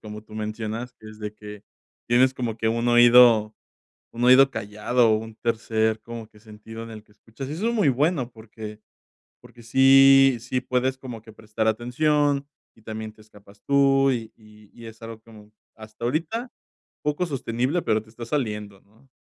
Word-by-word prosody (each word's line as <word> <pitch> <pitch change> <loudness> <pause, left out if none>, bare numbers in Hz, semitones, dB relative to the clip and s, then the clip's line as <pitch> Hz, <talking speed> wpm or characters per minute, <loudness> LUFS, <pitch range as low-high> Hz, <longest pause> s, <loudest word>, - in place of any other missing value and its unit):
como 105 0 -9
tú 110 - -20
mencionas, 110 +3 -5
que 110 -3 -15
es 110 0 -13
de 105 0 -6
que 105 -1 -11 0.4
tienes 130 +2 +3
como 120 -4 -4
que 110 0 -1
un 115 +1 -1
oído 120 -2 +6 0.6
un 120 - -6
oído 135 +2 +6
callado 115 +1 0
o 110 - +3
un 110 0 -9
tercer 110 -1 -1
como 115 0 -9
que 110 - -21
sentido 110 +1 -11
en 115 - -11
el 110 -1 -10
que - - -31
escuchas. 115 +5 -10
Eso 180 +10 -2
es 235 - -1
muy 205 -10 +2
bueno 135 -1 0
porque 110 -1 -11 0.6
porque 120 - -16
sí 135 +2 +6
sí 125 +2 -3
puedes 130 +1 -1
como 125 -4 -9
que 110 - -15
prestar 110 0 -4
atención 140 +5 0 0.3
y 110 - -24
también 110 0 -7
te 110 - -23
escapas 105 -1 -20
tú 135 -1 +3
y 115 -4 -4
y 105 -1 -20
y 115 -1 -12
es 110 0 -12
algo 115 -1 -9
que 115 - -20 0.4
hasta 110 +1 -11
ahorita 165 - -2 0.5
poco 150 +4 -1
sostenible, 135 +2 -2
pero 110 0 0
te 110 - -21
está 115 +1 -9
saliendo, 105 -7 -4
¿no? 110 +7 -28
115 Hz, 180 wpm, -24 LUFS, 110-130 Hz, 0.6 s, oído